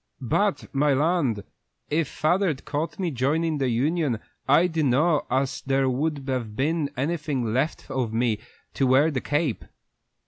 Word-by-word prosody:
"But, 200 - +1
my 140 0 +3
land! 145 - +1 0.5
if 155 0 +1
father'd 160 -2 0
caught 150 +2 -3
me 180 -4 -1
joinin' 150 +4 0
the 135 -2 +1
union 135 +1 0 0.3
I 145 +6 +5
dun'no' 155 -1 +2
as 135 +1 0
there 135 0 +1
would 140 +1 -2
have 120 -5 -2
been 150 +3 0
anything 140 -5 -1
left 135 +6 -1
of 125 -4 -1
me 115 -1 +1 0.3
to 135 - +1
wear 140 +5 +4
the 130 -4 -2
cape." 145 -4 -1
140 Hz, 145 wpm, -25 LUFS, 130-160 Hz, 0.5 s, I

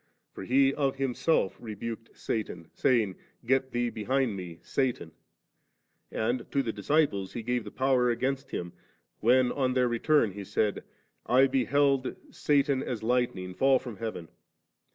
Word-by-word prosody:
For - - -7
He 135 +2 +4
of 140 -2 0
Himself 135 - +1
rebuked 115 +1 -7
Satan, 100 -7 -4
saying, 110 -8 +1
' - - -30
Get 130 +1 +2
thee 120 -1 -1
behind 120 +1 0
Me, 90 -3 -7
Satan 125 - -1 0.4
'; - - -49
' - - -46
and 120 +3 -2
to 140 -1 +1
the 115 -3 -3
dlisciples 100 -4 +1
He 115 - -5
gave 120 0 -1
the - - -6
power 130 0 +2
against 135 +3 -1
him, 85 -1 -5 0.5
when 125 +2 +4
on 130 -2 0
their 125 -1 +3
return 120 0 +2
He 100 +1 -7
said, 105 +2 -1 0.2
' - - -47
I 130 +2 +5
beheld 135 +1 +2 0.2
Satan, 140 -2 +2
as 120 -5 -4
lightning, 110 -6 0
fidl 135 +5 +4
from 120 -5 -8
heaven*.' 110 -8 -5
125 Hz, 160 wpm, -29 LUFS, 110-135 Hz, 0.5 s, I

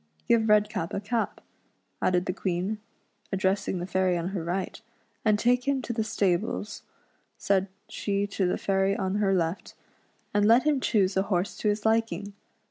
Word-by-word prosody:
Give 225 -2 +3
Redcap 210 -5 +2
a - - 0
cap," 225 +3 -2 0.6
added 180 0 +2
the 180 - -1
Queen, 185 +3 -2 0.5
addressing 190 0 0
the 175 - -3
fairy 185 -1 +1
on 170 +1 -2
her 190 -4 -3
right; 185 +5 -3 0.2
" - - -41
and 215 -2 +3
take 245 +3 +2
him 280 -1 +2
to 235 - -3
the 225 -1 0
stables," 205 0 -1 0.6
said 195 -1 +1 0.2
she 200 -1 -1
to 195 -2 -1
the 180 - 0
fairy 195 0 +1
on 190 +1 -1
her 195 -2 +2
left, 170 +1 -2 0.6
"and 205 0 +3
let 235 +3 +6
him 300 -3 +2
choose 200 -6 +2
a 190 - +3
horse 185 0 0
to 210 - 0
his 210 +1 -1
liking. 220 -2 0
200 Hz, 175 wpm, -27 LUFS, 185-215 Hz, 0.6 s, let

